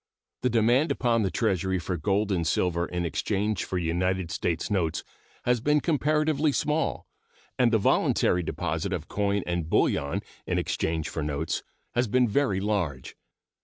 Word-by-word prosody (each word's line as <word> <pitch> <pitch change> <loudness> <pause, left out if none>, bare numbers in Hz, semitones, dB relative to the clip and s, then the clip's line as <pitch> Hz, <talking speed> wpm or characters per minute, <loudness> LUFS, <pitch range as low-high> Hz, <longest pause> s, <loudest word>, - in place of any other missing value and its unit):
The 125 - +2
demand 120 +6 +3
upon 115 -2 +2
the 100 - +1
Treasury 95 -3 0
for 90 +1 -3
gold 100 +5 0
and 85 -4 0
silver 85 0 +1
in 90 -1 -2
exchange 100 +6 -1
for 95 - -3
United 90 +1 0
States 85 +4 -2
notes 85 -6 0 0.4
has 125 0 +3
been 150 +6 +3
comparatively 155 -1 +1
small, 150 +3 0 0.5
and 120 -2 +4
the 115 - +4
voluntary 90 -3 +2
deposit 80 +3 -2
of 85 -3 -4
coin 100 -1 0
and 85 -2 -2
bullion 70 -3 +1 0.2
in - - 0
exchange 80 -1 -1
for 80 - -4
notes 75 +2 -2 0.3
has 120 0 +1
been 125 +3 +3
very 110 -4 +1
large. 95 -11 -2
95 Hz, 155 wpm, -27 LUFS, 85-120 Hz, 0.5 s, and